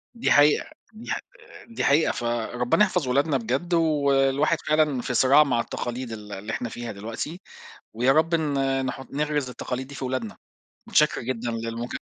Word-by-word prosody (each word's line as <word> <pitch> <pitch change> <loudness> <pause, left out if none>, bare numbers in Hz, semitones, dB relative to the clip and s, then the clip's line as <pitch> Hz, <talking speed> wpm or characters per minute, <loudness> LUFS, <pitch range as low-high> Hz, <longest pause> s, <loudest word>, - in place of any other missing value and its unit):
دي 235 - 0
حقيقة، 145 - +5 0.3
دي 225 +3 -8
ح - - -1
آآ، - - -15
دي 230 - -5
حقيقة، 150 +3 +4
فربنا 120 - 0
يحفظ 180 -7 -1
ولادنا 140 +3 +2
بجد، 130 +9 -2
والواحد 145 -2 +2
فعلًا 150 -4 +2
في 125 - -3
صراع 135 +5 +6
مع 125 -5 0
التقاليد 120 +1 -4
ال 105 -2 -8
اللي 105 +3 -6
إحنا 120 - -3
فيها 120 0 -6
دلوقتي، 115 - -6 0.5
ويا 125 +4 +3
رب 160 +4 +3
ن 135 -4 0
نحُطّ 135 +1 -5
نغرِس 150 -2 -1
التقاليد 125 +1 -5
دي 140 - -10
في 135 - -4
ولادنا، 125 -5 -4 0.5
متشكر - - +2
جدًا 120 -1 -3
للمكالمة. 115 +1 -4
135 Hz, 170 wpm, -25 LUFS, 120-150 Hz, 0.5 s, صراع